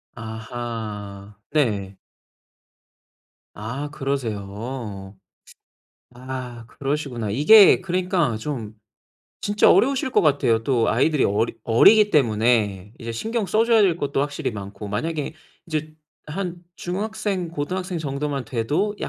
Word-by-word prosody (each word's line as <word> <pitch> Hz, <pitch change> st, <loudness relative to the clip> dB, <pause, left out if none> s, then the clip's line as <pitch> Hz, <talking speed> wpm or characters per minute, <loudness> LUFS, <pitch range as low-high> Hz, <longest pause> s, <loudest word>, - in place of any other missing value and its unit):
아하. 110 Hz, -3 st, -6 dB, 0.2 s
네. 105 Hz, -10 st, 0 dB, 1.6 s
아, 125 Hz, +8 st, -5 dB
그러세요. 110 Hz, -6 st, -4 dB, 1.0 s
아, 125 Hz, -2 st, -7 dB
그러시구나. 135 Hz, -5 st, -3 dB
이게 170 Hz, -, +7 dB
그러니까 180 Hz, -, 0 dB
좀 115 Hz, -5 st, -5 dB, 0.7 s
진짜 205 Hz, +1 st, +4 dB
어려우실 265 Hz, 0 st, +3 dB
것 -, -, +4 dB
같아요. 115 Hz, -7 st, +2 dB
또 120 Hz, -3 st, +2 dB
아이들이 145 Hz, +6 st, +2 dB
어리 105 Hz, +3 st, +1 dB
어리기 210 Hz, -, +6 dB
때문에 110 Hz, -, +1 dB
이제 115 Hz, -1 st, -5 dB
신경 220 Hz, -, -2 dB
써 215 Hz, +3 st, +2 dB
줘야 230 Hz, -1 st, +4 dB
될 185 Hz, -5 st, +3 dB
것도 145 Hz, -4 st, -2 dB
확실히 145 Hz, -2 st, -2 dB
많고. 100 Hz, 0 st, -7 dB
만약에 155 Hz, +9 st, -3 dB, 0.3 s
이제 155 Hz, -1 st, -3 dB, 0.3 s
한 175 Hz, +2 st, -4 dB, 0.2 s
중학생, 200 Hz, -1 st, -3 dB
고등학생 180 Hz, +4 st, -3 dB
정도만 140 Hz, -2 st, -3 dB
돼도 150 Hz, -, -1 dB
135 Hz, 240 characters per minute, -23 LUFS, 110-170 Hz, 1.6 s, 이게